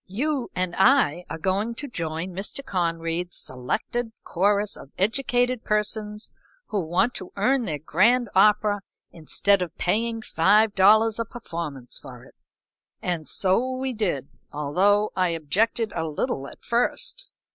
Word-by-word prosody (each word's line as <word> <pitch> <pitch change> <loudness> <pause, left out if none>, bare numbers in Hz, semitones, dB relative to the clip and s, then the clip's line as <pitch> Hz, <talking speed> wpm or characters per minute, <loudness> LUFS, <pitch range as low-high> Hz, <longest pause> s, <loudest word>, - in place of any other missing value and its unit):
"You 260 +6 -2
and 180 -1 -1
I 190 - +4
are - - -4
going 195 +7 -1
to 285 - -5
join 165 - -4
Mr. 200 +9 -5
Conried's 170 0 -2
selected 175 - -3
chorus 205 +3 +1
of - - -12
educated 245 +3 +1
persons 210 0 -2 0.4
who 210 - 0
want 185 +7 +1
to 185 - -7
earn 250 +5 +2
their 155 -6 -2
grand 225 - +3
opera 205 +1 +4 0.3
instead 185 +4 +2
of 170 -2 -4
paying 225 +4 0
five 205 +6 +3
dollars 215 +3 +5
a - - +1
performance 165 - -6
for - - -11
it." - - -17 0.7
And 170 -4 -2
so 225 +7 +1
we 260 0 -2
did, 175 - -1 0.2
although 190 +9 +2
I 185 -1 +2
objected 205 +8 0
a 165 -1 -1
little 140 -2 -2
at - - -14
first. 245 - -1
200 Hz, 140 wpm, -25 LUFS, 170-225 Hz, 0.7 s, dollars